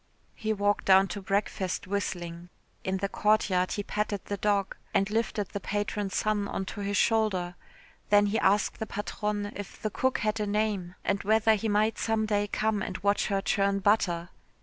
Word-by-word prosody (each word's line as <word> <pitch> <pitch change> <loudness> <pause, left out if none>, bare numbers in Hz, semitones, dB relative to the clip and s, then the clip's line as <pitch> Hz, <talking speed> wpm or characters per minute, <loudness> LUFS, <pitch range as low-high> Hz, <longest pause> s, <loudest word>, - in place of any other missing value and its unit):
He 220 -1 -3
walked 205 -1 +1
down 190 0 +6
to 200 +3 -5
breakfast 195 -1 -1
whistling. 175 -3 -4 0.3
In 190 0 -1
the 200 +1 -1
courtyard 195 -3 +2
he 205 - -2
patted 210 -1 -2
the 205 - -3
dog 200 -1 0 0.2
and 195 - +3
lifted 220 -2 -1
the 200 - -4
patron's 205 0 -2
son 210 -1 +1
on 195 - -3
to - - -8
his 200 0 -1
shoulder, 205 -6 +2 0.6
then 205 0 +6
he 205 +2 +1
asked 200 +1 +2
the 220 - -3
patronne 205 0 -3
if 205 -2 -8
the 215 - -2
cook 260 +4 +1
had 215 +1 -1
a 210 - -1
name 205 -4 -1
and 200 0 0
whether 220 +1 +4
he 215 +1 -1
might 210 +2 +2
some 225 -1 +1
day 205 -1 +1
come 215 0 0
and 185 -1 -3
watch 200 0 +2
her 195 -1 0
churn 200 0 +1
butter. 185 -4 +1
205 Hz, 185 wpm, -28 LUFS, 195-215 Hz, 0.6 s, down